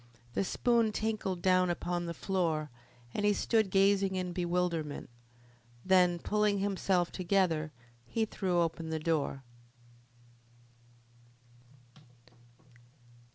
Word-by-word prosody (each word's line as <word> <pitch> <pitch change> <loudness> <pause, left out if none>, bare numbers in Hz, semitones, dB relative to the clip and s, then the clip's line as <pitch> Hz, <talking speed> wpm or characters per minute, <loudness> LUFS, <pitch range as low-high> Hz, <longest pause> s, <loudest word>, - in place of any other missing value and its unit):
The - - 0
spoon 230 +2 +2
tinkled 210 -5 -2
down 185 -1 +4
upon 175 0 -2
the 170 - -4
floor, 165 -7 -1 0.4
and 205 - -2
he 205 0 +4
stood 220 0 +1
gazing 195 0 +3
in 180 -1 -3
bewilderment. 175 -6 -2 0.7
Then, 180 -2 +4
pulling 210 +3 +1
himself 190 -3 0
together, 175 -5 0 0.4
he 225 - 0
threw 185 -4 0
open 165 -1 -2
the 160 - -1
door. 155 -4 -1
185 Hz, 100 wpm, -31 LUFS, 170-200 Hz, 0.7 s, down